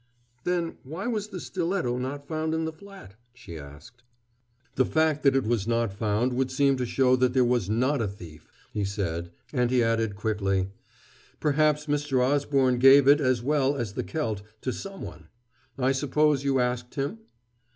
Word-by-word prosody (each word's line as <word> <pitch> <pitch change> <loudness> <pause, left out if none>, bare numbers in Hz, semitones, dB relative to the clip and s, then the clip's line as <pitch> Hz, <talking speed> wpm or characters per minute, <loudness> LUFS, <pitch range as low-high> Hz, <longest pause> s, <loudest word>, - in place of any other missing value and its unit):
"Then, 175 -2 -1
why 160 +8 -7
was 215 -4 -2
the 195 -4 -7
stiletto 170 -9 -2
not 140 +3 -5
found 160 0 -1
in 160 0 -1
the 160 - -4
flat?" 195 - -13 0.2
she 120 -9 -10
asked. 75 - -13 0.7
"The 130 - +3
fact 155 +1 +1
that 140 -2 +4
it 135 - +2
was 110 -2 -1
not 115 -3 0
found 110 +4 0
would 130 +1 0
seem 140 +1 +2
to 125 -1 -2
show 130 +1 +3
that 125 -1 +2
there 130 -1 +4
was 120 -5 +1
not 130 +5 +1
a 110 - 0
thief," 85 -6 -11 0.2
he 105 - -1
said; 85 -4 -3 0.2
and 125 -1 +2
he 125 -1 +3
added 115 -2 0
quickly: 100 -3 -1 0.7
"Perhaps 150 0 +2
Mr. 145 -3 0
Osborne 135 -1 +2
gave 135 +1 +7
it, 145 +2 +6
as 130 -3 +1
well 140 0 +2
as 115 -7 -3
the - - -3
celt, 110 -11 -3 0.2
to 130 - -2
someone. 195 -1 -8 0.5
I 130 0 +2
suppose 145 +1 +2
you 135 -1 +1
asked 125 0 -2
him?" 145 +11 -3
130 Hz, 175 wpm, -26 LUFS, 115-150 Hz, 0.7 s, gave